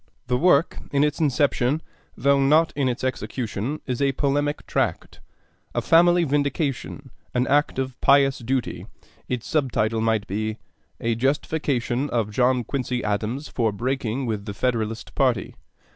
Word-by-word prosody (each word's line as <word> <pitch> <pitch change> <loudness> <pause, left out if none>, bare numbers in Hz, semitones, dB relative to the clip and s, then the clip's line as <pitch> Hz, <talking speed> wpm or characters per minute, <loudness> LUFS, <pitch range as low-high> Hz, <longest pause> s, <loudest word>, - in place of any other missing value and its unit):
The 125 0 0
work 160 +2 +3
in 140 0 +3
its 150 -1 0
inception 145 -2 +2 0.4
(though 140 +3 +3
not 155 +4 +4
in 140 -3 +1
its 125 +1 -4
execution) 130 0 -3
is 125 -1 -3
a 140 -1 +2
polemic 145 +2 0
tract - - -2 0.6
a - - +1
family 175 +1 +5
vindication, 140 -2 -2 0.2
an 125 0 +2
act 145 0 +2
of 130 -1 -3
pious 140 -1 +4
duty; 130 +1 -2 0.4
its 125 -2 -2
sub 145 -5 0
title 110 +1 0
might 110 -2 +1
be, 110 +2 -3 0.4
'A 115 0 +1
Justification 135 0 0
of 115 -3 -1
John 125 +2 +2
Quincy 125 0 -2
Adams 110 +7 -2
for 115 -3 0
Breaking 125 +3 -2
with 105 -3 -3
the 100 -2 -6
Federalist 115 -1 -2
Party.' - - +1
130 Hz, 145 wpm, -24 LUFS, 115-140 Hz, 0.6 s, family